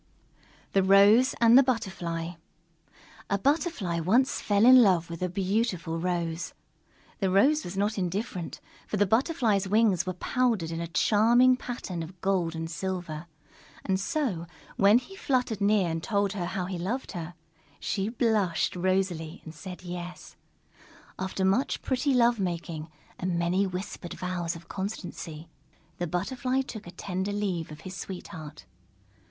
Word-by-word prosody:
_ - - -37
THE 195 - +4
ROSE 200 +7 +6
AND 230 0 +6
THE 270 - +10
BUTTERFLY 180 -9 -2 0.9
A 200 - +2
Butterfly 270 - 0
once 230 +11 +2
fell 205 +1 +3
in 255 0 +9
love 175 -6 +3
with 170 - -7
a 180 - 0
beautiful 185 -3 -1
Rose. 170 -1 -2 0.6
The 195 - +1
Rose 275 +12 +4
was 185 +2 -6
not 205 +1 0
indifferent, 185 -1 -3 0.3
for 210 - -2
the 205 - +4
Butterfly's 225 - +2
wings 200 -4 +3
were 185 - -1
powdered 220 -5 0
in 165 0 -3
a 170 - -3
charming 235 +8 +4
pattern 235 -9 -5
of 175 +3 -9
gold 180 -4 0
and 165 0 -3
silver. 170 -1 -4 0.6
And 190 -1 +1
so, 195 - -1 0.3
when 205 +3 +6
he 320 +10 -6
fluttered 250 - 0
near 200 -4 +3
and 165 0 -2
told 200 +1 0
how 180 -1 -3
he 185 -1 -4
loved 230 +10 -3
her, 175 -2 -6 0.4
she 200 +1 -1
blushed 215 -9 +1
rosily 180 -2 -1
and 160 - -8
said 180 +3 -9
yes. 175 0 -7 0.8
After 190 0 -1
much 195 +8 +1
pretty 265 +1 +1
love 240 -2 +4
making 170 -4 -3 0.3
and 180 -1 -1
many 180 +3 +1
whispered 185 -1 -6
vows 175 -2 -3
of 165 0 -12
constancy, 175 -5 -6 0.5
the 175 - -1
Butterfly 255 +10 -1
took 220 -7 -8
a - - -8
tender 190 +2 -3
leave 195 -5 -2
of 150 0 -10
his 185 +2 -8
sweetheart. 165 -5 -8
190 Hz, 150 wpm, -28 LUFS, 175-220 Hz, 0.9 s, THE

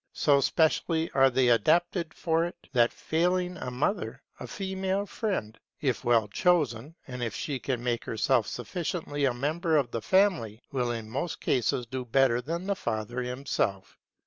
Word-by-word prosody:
So 140 -2 +3
specially 160 +2 +1
are 135 0 +5
they 130 -1 +3
adapted 170 - +2
for 165 0 0
it, 175 - -6 0.2
that 120 -2 +4
failing 180 +2 0
the 130 -7 -5
mother, 130 +11 -2 0.2
a - - -7
female 190 0 -2
friend, 190 - -3 0.2
if 130 -4 -1
well 115 -3 +3
chosen, 150 - +1
and 125 -1 -6
if 115 -3 -2
she 140 -4 -3
can 125 -3 -3
make 120 -1 -1
herself 115 0 +1
sufficiently 145 0 -3
a 130 - +2
member 155 +5 +1
of 130 -5 0
the 115 - -3
family, 165 - +2
will 125 -3 0
in 115 -2 -4
most 140 +9 -3
cases 125 0 0
do 130 +2 -4
better 125 0 +3
than 165 +7 -4
the 200 0 0
father 110 - -3
himself. 125 -7 -2
135 Hz, 165 wpm, -28 LUFS, 120-170 Hz, 0.2 s, are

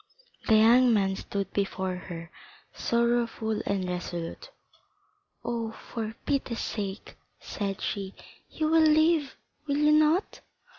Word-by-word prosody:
The 220 - +6
young 240 +3 +6
man 195 -2 +1
stood 195 0 -4
before 190 -2 -1
her, 170 -2 -8 0.4
sorrowful 235 -2 0
and 195 -2 -1
resolute. 175 -2 -5 1.0
"Oh, 230 -2 -2
for 220 -1 -6
pity's 270 -4 -1
sake," 200 -2 -5 0.2
said 195 -2 -4
she, 195 -1 -3 0.3
"you 310 - -1
will 325 0 +5
live, 315 -1 +3 0.3
will 285 0 0
you 300 0 +4
not?" 310 +5 +3
220 Hz, 115 wpm, -28 LUFS, 195-280 Hz, 1.0 s, The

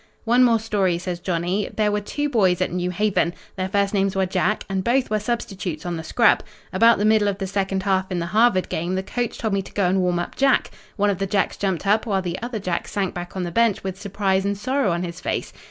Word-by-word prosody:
"One 240 +2 +4
more 230 -2 +4
story," 200 -5 0
says 175 0 -4
Johnny. 180 +3 -1
"There 210 -1 +1
were 210 0 0
two 290 +8 -2
boys 190 -10 +2
at 185 - 0
New 180 0 -1
Haven. 185 -2 0 0.2
Their 185 0 -2
first 200 +1 +1
names 195 -1 +1
were 190 0 +2
Jack, 185 +3 0
and 190 -1 -2
both 245 +1 +1
were 215 - +2
substitutes 195 -8 -4
on 175 -1 -2
the 160 - -5
scrub. 235 +8 +3 0.3
About 230 +5 +5
the 205 - 0
middle 215 -1 +4
of 200 -1 -1
the 195 - -3
second 190 0 -1
half 190 -1 +1
in 180 - -1
the 170 - -1
Harvard 215 -4 +4
game, 175 +3 -2
the 190 - -1
coach 240 +3 -3
told 220 -3 -2
me 195 - +1
to 190 - -13
go 200 - +1
and 185 +1 +2
warm 180 -1 +1
up 175 - -4
Jack. 270 -1 +2 0.2
One 205 -1 +2
of 195 - -4
the 195 - -1
Jacks 195 0 0
jumped 190 -2 -2
up, 215 +4 +2
while 195 -3 0
the 180 +2 -4
other 240 -1 -4
Jack 185 -4 -2
sank 195 -3 -2
back 175 +1 -7
on 185 - -2
the 175 - -4
bench 230 +1 +2
with 190 0 -5
surprise 195 -1 0
and 200 0 -1
sorrow 260 +2 0
on 170 +1 -1
his 175 0 -6
face. - - -3
195 Hz, 255 wpm, -23 LUFS, 185-215 Hz, 0.3 s, About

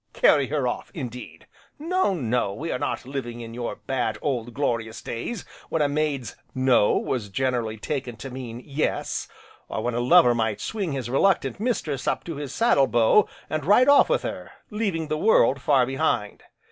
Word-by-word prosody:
Carry 140 -3 +4
her 145 -4 0
off, 125 - -4
indeed! 125 -5 -7 0.3
No 335 - +1
no, 120 - -1
we 160 +9 -4
are - - -2
not - - -3
living 125 -3 -5
in 115 0 -8
your 120 0 -4
bad, 120 -5 -2
old, 120 -5 -2
glorious 115 -3 -2
days 175 - -5 0.2
when 160 - +1
a - - +3
maid's 145 -5 -2 0.2
"No" 130 -5 +4
was 115 -6 -2
generally 115 0 -1
taken 130 0 -4
to 125 +4 -8
mean 125 -2 -7
"Yes" 150 +1 -2 0.4
or 110 - -3
when 120 - -1
a 120 - -1
lover 125 0 +6
might 110 -3 -1
swing 195 -8 -3
his 130 -4 -3
reluctant 135 +3 +1
mistress 185 - -2
up - - 0
to 165 -4 -6
his 145 -2 -5
saddle 140 - +3
bow, 120 - +4 0.2
and 155 -1 -2
ride 210 - +5
off 285 - +6
with - - +1
her, - - -5 0.2
leaving 195 -7 -1
the 155 0 -2
world 140 - +4
far 135 -3 +4
behind. 130 -6 -1
135 Hz, 180 wpm, -25 LUFS, 120-155 Hz, 0.4 s, lover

